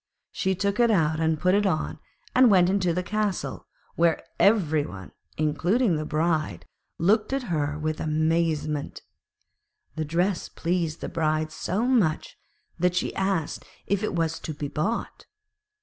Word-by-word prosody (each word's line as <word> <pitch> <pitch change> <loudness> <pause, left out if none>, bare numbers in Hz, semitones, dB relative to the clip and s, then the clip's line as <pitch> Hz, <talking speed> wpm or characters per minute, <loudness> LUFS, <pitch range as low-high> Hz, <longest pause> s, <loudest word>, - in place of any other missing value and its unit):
She 190 -1 0
took 200 +4 -1
it 240 -1 +5
out, 160 -6 +2 0.2
put 185 +1 +3
it 205 0 +3
on, 165 -5 -1 0.3
and 255 -1 +6
went 185 -3 +5
into 190 -3 +1
the 180 +2 -1
castle, 210 -1 -2 0.3
where 165 -1 +2 0.2
every 165 -8 +4
one, 95 -8 -9 0.3
including 170 - +1
the 155 0 -3
Bride, 155 0 -1 0.3
looked 210 +7 +2
at 270 -1 -1
her 145 -1 -1
with 155 0 -2
amazement. 155 -1 0 0.9
The 155 - -1
dress 175 +5 0
pleased 170 -2 -2
the - - -3
Bride 155 -1 0
so 205 +7 -2
much 215 -12 +1 0.4
that 180 +1 +2
she 185 - -1
asked 190 -5 -1 0.2
if 200 -1 0
it 215 - -2
was 165 -1 0
to 155 - -6
be 145 0 -4
bought. 190 +12 -3
170 Hz, 150 wpm, -26 LUFS, 155-200 Hz, 0.9 s, and